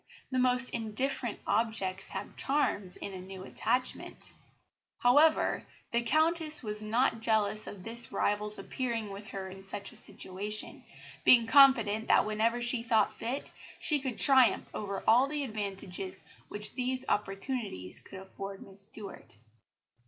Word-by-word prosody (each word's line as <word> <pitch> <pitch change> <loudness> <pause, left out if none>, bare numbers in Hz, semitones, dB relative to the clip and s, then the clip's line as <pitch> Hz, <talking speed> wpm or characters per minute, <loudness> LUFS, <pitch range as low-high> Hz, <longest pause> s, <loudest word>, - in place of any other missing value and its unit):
The 255 - 0
most 250 0 +3
indifferent 235 +1 -2
objects 200 -3 -1
have - - -7
charms 210 -10 0
in 200 - -7
a 185 - -7
new 190 0 -9
attachment; 255 +6 -3 0.6
however, 290 +6 +3 0.3
the 235 - +1
Countess 315 +4 +3
was 210 -1 -4
not 225 +2 0
jealous 215 -2 +1
of 190 -3 -9
this 235 +3 0
rival's 210 +1 -1
appearing 230 -5 -4
with 200 +2 -8
her 195 -2 -6
in 190 +1 -11
such 200 +1 -6
a - - -15
situation, 205 +3 -4 0.4
being 235 -2 +6
confident 225 -4 +5
that - - +4
whenever 225 +3 0
she 240 0 +3
thought 225 -3 +2
fit, 245 +5 -4 0.3
she 300 -2 +5
could 260 -4 -4
triumph 265 -4 +6
over 200 -2 -5
all 245 +4 +5
the 295 0 -2
advantages 195 -5 -5 0.2
which 210 +1 -3
these 255 0 -2
opportunities 195 - -3
could 190 - -11
afford 195 0 -9
Miss 195 0 -13
Stuart." 195 - -9
220 Hz, 140 wpm, -30 LUFS, 200-250 Hz, 0.6 s, being